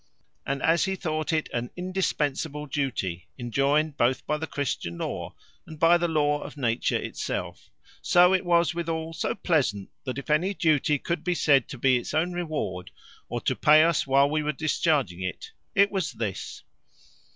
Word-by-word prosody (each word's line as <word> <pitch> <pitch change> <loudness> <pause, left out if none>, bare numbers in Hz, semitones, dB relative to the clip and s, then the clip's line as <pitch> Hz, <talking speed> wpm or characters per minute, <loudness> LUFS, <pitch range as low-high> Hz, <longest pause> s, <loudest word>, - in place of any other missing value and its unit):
And 140 -1 -2
as 165 +1 +3
he 190 0 -1
thought 155 -4 -2
it 155 -1 0
an 120 0 -2
indispensable 160 -5 -2
duty, 120 - -3
enjoined 140 +5 +1
both 125 +1 +1
by 150 - 0
the 160 - -4
Christian 105 -11 -3
law, - - -5 0.3
and 160 - -10
by 170 +1 +5
the 175 - +1
law 150 -2 +1
of - - -9
nature 120 -4 0
itself; - - -5 0.3
so 180 +1 +5
was 170 -1 +3
it - - -2
withal 165 -1 -3
so - - -2
pleasant, 135 - 0
that 130 0 -4
if 140 - -4
any 180 +6 +2
duty 150 -3 +2
could 170 +5 -3
be 180 -1 0
said 140 -6 +3
to 135 - -8
be 130 +1 +3
its 120 - -5
own 175 +3 +1
reward, 155 - -3 0.4
or - - -3
to - - 0
pay 155 +1 +6
us 165 -4 +1
while 135 +1 +4
we 155 +1 0
are 150 0 0
discharging 145 - 0
it, 95 0 -5 0.2
it 200 +1 +5
was 190 -8 -2
this. 110 -4 -5
150 Hz, 175 wpm, -26 LUFS, 135-165 Hz, 0.4 s, pay